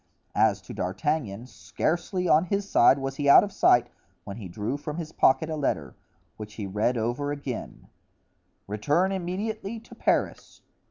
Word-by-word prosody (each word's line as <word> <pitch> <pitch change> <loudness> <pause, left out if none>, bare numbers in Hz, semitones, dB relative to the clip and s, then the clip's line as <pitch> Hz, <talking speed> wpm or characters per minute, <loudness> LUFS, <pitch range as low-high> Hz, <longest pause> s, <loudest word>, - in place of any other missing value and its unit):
As - - +2
to - - -9
D'Artagnan, 110 - -2
scarcely, 175 +7 -2
on 160 +2 +4
his 200 +2 -2
side, 135 -6 +5
was 135 0 -4
he 145 -1 +1
out - - +9
of 205 - -4
sight 120 -9 +4 0.4
when 100 - -8
he 105 -5 -7
drew 105 +8 -3
from 150 +2 -6
his 160 -2 -5
pocket 135 0 +3
a 160 - -3
letter, 80 - -2 0.4
which 105 0 -9
he 105 - -5
read 105 +6 0
over 120 +6 -2
again: 140 -5 -6 0.8
"Return 145 - 0
immediately 200 +4 -4
to 235 - -15
Paris. - - -1
145 Hz, 160 wpm, -26 LUFS, 110-175 Hz, 0.8 s, out